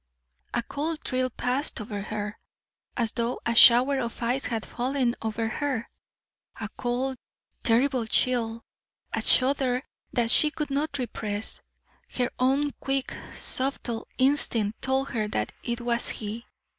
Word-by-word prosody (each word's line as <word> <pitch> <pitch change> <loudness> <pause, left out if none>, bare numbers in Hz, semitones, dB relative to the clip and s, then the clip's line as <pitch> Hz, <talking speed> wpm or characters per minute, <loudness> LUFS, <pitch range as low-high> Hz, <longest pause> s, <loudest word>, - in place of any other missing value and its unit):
A 240 - +1
cold 305 +5 -3
thrill 255 0 0
passed 255 +4 -1
over 205 -1 -5
her, 210 0 -4 0.6
as 230 -3 +1
though 235 +1 -1
a 235 - +1
shower 250 +4 +7
of 235 -1 -4
ice 250 +3 +1
had 225 -2 -2
fallen 250 -1 0
over 225 0 -1
her 255 0 -2 0.7
a 215 -2 -4
cold, 250 +3 -2 0.4
terrible 245 0 +2
chill, 230 -1 +1 0.5
a - - 0
shudder 260 -1 +4 0.3
that 235 -2 +2
she 305 - +6
could 300 -1 -4
not 285 +1 0
repress. 220 -4 -3 0.6
Her 250 -1 +1
own 275 +3 +2
quick, 270 -1 -2 0.2
subtle 255 -3 -1
instinct 240 -6 +1
told 265 +1 0
her 215 -3 -1
that 105 - -2
it 235 0 -3
was 235 0 +1
he. 220 +2 -4
245 Hz, 135 wpm, -27 LUFS, 225-270 Hz, 0.7 s, shower